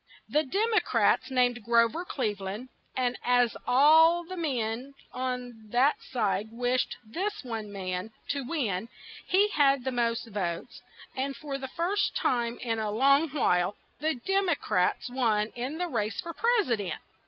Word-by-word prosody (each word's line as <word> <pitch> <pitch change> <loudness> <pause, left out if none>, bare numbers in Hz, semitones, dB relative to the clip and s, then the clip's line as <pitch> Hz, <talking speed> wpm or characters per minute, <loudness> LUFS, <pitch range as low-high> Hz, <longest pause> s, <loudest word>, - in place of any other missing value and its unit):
The 300 - +2
Dem 410 - 0
o 430 - +6
crats - - +2
named 245 -3 +1
Gro 230 +1 +5
ver 320 +9 -5
Cleve 240 - -2
land; 205 +7 -5 0.3
and 250 -1 0
as 245 -1 +3
all 320 +6 +6
the 370 +2 -7
men 260 -4 -2 0.2
on 250 -3 -4
that 255 +6 +3
side 215 -4 -1
wished 245 +2 0
this 380 - -3
one 225 -4 -5
man 185 0 -4 0.2
to 285 -1 -1
win, 235 - -2 0.4
he 400 +3 +4
had 275 -7 +3
the 260 - -1
most 235 -1 0
votes; 180 -5 -4 0.3
and 275 +1 -2
for 280 -2 -5
the 265 - -5
first 365 +5 0
time 235 -1 0
in 225 -2 -1
a 215 -1 -1
long 275 +8 +4
while, 190 -9 +1 0.2
the 315 0 0
Dem 385 +9 0
o 335 - +3
crats 180 -6 0
won 225 -4 +1
in 255 +7 -5
the 355 +1 -1
race 225 - -2
for 340 -2 -4
pres 455 - +2
i - - +5
dent. 200 -3 -4
250 Hz, 170 wpm, -28 LUFS, 225-305 Hz, 0.4 s, o